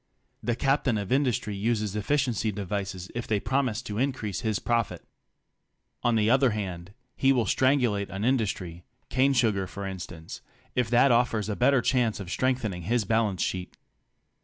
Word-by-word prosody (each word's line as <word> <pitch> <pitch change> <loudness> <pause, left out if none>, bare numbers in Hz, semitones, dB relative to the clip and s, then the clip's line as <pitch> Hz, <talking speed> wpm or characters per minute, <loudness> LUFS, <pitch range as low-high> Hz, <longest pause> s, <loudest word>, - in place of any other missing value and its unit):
The 120 - -1
captain 135 -3 +1
of 100 -2 -4
industry 125 -6 +1
uses 105 -1 -1
efficiency 115 -1 0
devices 95 -2 -4
if 120 0 -4
they 105 -2 +1
promise 125 0 0
to 105 -2 -4
increase 125 -7 -2
his 110 -4 0
profit. 115 -1 -1 1.0
On 120 -1 +2
the 110 -1 +2
other 130 +2 +4
hand, 95 -3 -5 0.2
he 135 - +3
will 125 -4 +2
strangulate 125 -7 +2
an 95 +3 -3
industry 95 -9 -1
— 125 - -44
cane 135 +2 +3
sugar 110 -7 +1
for 100 +2 -7
in 95 -1 -5
stance—if 90 +7 -6
that 125 +3 +5
offers 115 -3 +2
a 105 - -1
better 125 +1 +3
chance 120 -5 +1
of 95 -3 -7
strengthening 120 -8 -1
his 110 +5 0
balance 110 -3 +1
sheet. 90 -1 -4
110 Hz, 160 wpm, -27 LUFS, 100-125 Hz, 1.0 s, that